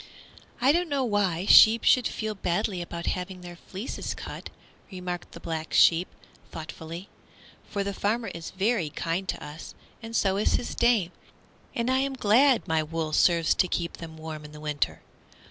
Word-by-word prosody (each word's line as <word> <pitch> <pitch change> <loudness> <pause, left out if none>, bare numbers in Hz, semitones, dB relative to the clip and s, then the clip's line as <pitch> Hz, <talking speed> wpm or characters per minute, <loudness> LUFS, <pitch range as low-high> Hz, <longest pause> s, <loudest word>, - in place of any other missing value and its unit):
"I 260 +3 +5
don't 345 +2 +1
know 280 -2 0
why 200 -6 0
sheep 220 +2 +8
should 250 -2 +4
feel 220 -1 -3
badly 185 0 -1
about 170 0 -6
having 185 0 -3
their 175 -1 -9
fleeces 195 +7 -6
cut," - - -8 0.4
remarked 180 -2 -6
the - - -9
Black 160 -1 -5
Sheep, 170 +2 +5 0.4
thoughtfully, 165 +3 -8 0.6
"for 200 -1 -2
the 200 0 -3
farmer 225 +4 -1
is 165 -1 -7
very 195 -3 0
kind 170 +5 -3
to - - -3
us, 150 +2 -9 0.3
and 225 0 -7
so 195 -3 +2
is 210 - +2
his - - -1
dame, 230 -7 +2 0.6
and 235 +2 0
I 260 - +3
am 275 0 0
glad 255 +2 +4
my 160 -1 +2
wool 155 0 -3
serves 170 -1 +4
to 185 - +2
keep 170 -1 -3
them 160 -1 -9
warm 155 -1 -7
in 150 0 -11
the 150 - -10
winter. 150 -1 -2
185 Hz, 175 wpm, -27 LUFS, 165-225 Hz, 0.6 s, sheep